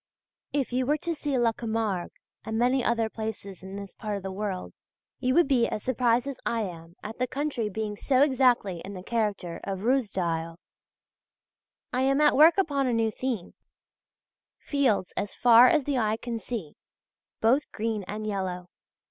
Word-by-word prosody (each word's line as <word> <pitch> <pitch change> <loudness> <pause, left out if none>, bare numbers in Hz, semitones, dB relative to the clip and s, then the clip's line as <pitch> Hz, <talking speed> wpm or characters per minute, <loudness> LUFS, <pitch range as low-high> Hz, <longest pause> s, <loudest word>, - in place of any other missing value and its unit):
If 275 -4 -1
you 255 0 0
were 300 +2 +3
to 335 +3 -2
see 290 -3 -2
La 235 -2 +3
Camargue, 220 -5 -2 0.3
and 220 0 -3
many 250 +2 +2
other 230 -1 +1
places 220 -4 -6
in 190 +1 -8
this 200 -1 -8
part 210 -2 -4
of 195 - -9
the 190 - -4
world, 190 -1 -4 0.5
you 255 0 +1
would 345 -4 +5
be 250 -4 +3
as 210 - -4
surprised 245 -1 +2
as 280 -2 -5
I 230 -1 0
am 170 -4 -7
at 220 +3 -7
the 255 - +1
country 275 -5 -2
being 210 +1 -3
so 260 +5 +3
exactly 250 - +2
in 200 +1 -7
the 180 - -8
character 200 -7 -2
of 195 -1 -4
Ruysdael. 180 -10 0 1.4
I 250 - +1
am 275 +1 +3
at 300 0 +5
work 320 +5 +7
upon 285 -8 +1
a 245 - +1
new 225 -1 +1
theme: 235 -7 -4 1.0
fields 245 -10 0
as 200 0 -3
far 240 0 +7
as 300 +2 +3
the 275 -2 0
eye 215 -1 +1
can 235 0 -4
see, 215 -11 -5 0.7
both 255 +7 +2
green 220 -1 -2
and 215 +1 -5
yellow. 185 -3 -3
225 Hz, 175 wpm, -27 LUFS, 200-260 Hz, 1.4 s, work